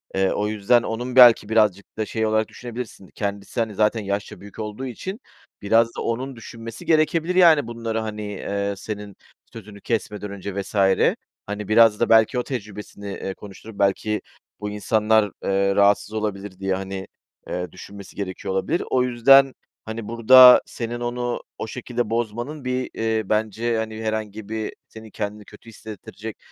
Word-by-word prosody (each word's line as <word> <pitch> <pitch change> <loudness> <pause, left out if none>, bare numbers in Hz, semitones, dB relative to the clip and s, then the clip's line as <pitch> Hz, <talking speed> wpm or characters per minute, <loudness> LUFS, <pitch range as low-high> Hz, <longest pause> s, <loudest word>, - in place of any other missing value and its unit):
eee, 95 0 +2
o 105 0 -1
yüzden 110 +3 +2
onun 120 +3 -4
belki 120 -4 +8
birazcık 105 -3 +1
da 110 - -1
şey 110 0 -2
olarak 110 0 +1
düşünebilirsin 120 -5 -8
kendisi, 100 +1 -4
hani, 110 -3 -1
zaten 110 +2 +2
yaşça 100 0 -4
büyük 100 +1 -12
olduğu 105 +4 -5
için 190 - -6 0.4
biraz 115 +3 +4
da - - -4
onun 130 +3 -3
düşünmesi 115 0 -9
gerekebilir, 160 +2 +2
yani, 160 -8 +6
bunları, 115 -1 -3
hani, 105 -1 -5
eee, 100 +1 -3
senin 105 -1 -7 0.4
sözünü 105 -2 -11
kesmeden 105 -3 -3
önce 100 0 -5
vs. 100 - -11 0.7
hani, 105 0 -5
biraz 110 -1 +5
da 120 - +1
belki 115 +3 +5
o 125 - -1
tecrübesini, 105 -4 -7
eee, 95 - -5
konuşturup 105 +1 -12
belki 105 +2 +1 0.4
bu 105 - -4
insanlar, 105 0 +2
eee, 100 0 +1
rahatsız 100 +1 +3
olabilir 100 -3 -4
diye, 95 -1 0
hani, 95 0 -5 0.4
eee, 90 0 -4
düşünmesi 100 +2 -11
gerekiyor 95 -1 -4
olabilir. 95 - 0
O 125 - +2
yüzden, 130 +2 +5 0.3
hani, 110 -1 -6
burada 125 +2 +8
senin 120 0 -5
onu 120 0 -3 0.2
o - - -5
şekilde 120 -1 -4
bozmanın 120 +5 -3
bir, 125 0 -2
eee, 110 -2 -1
bence, 110 +2 0
hani, 110 0 -4
herhangi 110 -1 -4
bir 110 -1 -3 0.2
senin 110 0 -12
kendini 105 0 -5
kötü 105 +3 -15
hissettirecek 110 0 -9
110 Hz, 160 wpm, -23 LUFS, 100-120 Hz, 0.7 s, belki